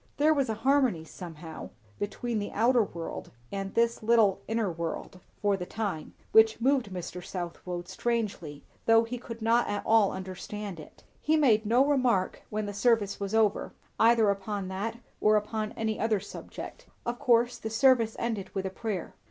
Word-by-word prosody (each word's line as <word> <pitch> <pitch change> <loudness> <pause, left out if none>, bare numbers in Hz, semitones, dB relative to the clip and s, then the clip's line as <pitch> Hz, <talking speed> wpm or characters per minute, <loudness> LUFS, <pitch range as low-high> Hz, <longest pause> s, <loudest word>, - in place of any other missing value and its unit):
There 305 +2 +5
was 275 -5 0
a 220 - 0
harmony, 260 - +2
somehow, 160 - -9 0.3
between 220 +2 -2
the 205 - -4
outer 240 +3 +4
world 170 -5 -5 0.2
and 195 -1 -4
this 235 0 +2
little 220 -3 +4
inner 225 -4 0
world, 170 +2 -5 0.2
for 205 -1 +3
the 180 -2 -5
time, 200 -8 -4 0.2
which 220 0 +6
moved 260 -2 +2
Mr. 180 0 -6
Southwode 175 0 -5
strangely, 190 -8 -3 0.2
though 225 0 +6
he 240 +2 -5
could 230 -2 -8
not 230 +2 +3
at 205 - -2
all 220 -3 +4
understand 190 0 -6
it. 155 - -13 0.2
He 315 +1 +3
made 225 -8 +4
no 245 +5 +4
remark 255 -9 +1
when 215 0 -2
the 205 - -5
service 205 -1 +2
was 200 +1 -2
over, 215 -2 +2 0.3
either 225 -2 +5
upon 200 -1 -4
that 205 +5 -3 0.2
or 215 0 +4
upon 215 0 -1
any 220 -1 -2
other 220 -2 +2
subject. - - -9 0.2
Of 240 +1 -3
course 240 0 +3
the 220 - -4
service 230 -1 +4
ended 220 -5 -2
with 195 -1 -1
a 190 - -2
prayer. 195 -3 -4
215 Hz, 170 wpm, -29 LUFS, 190-235 Hz, 0.3 s, which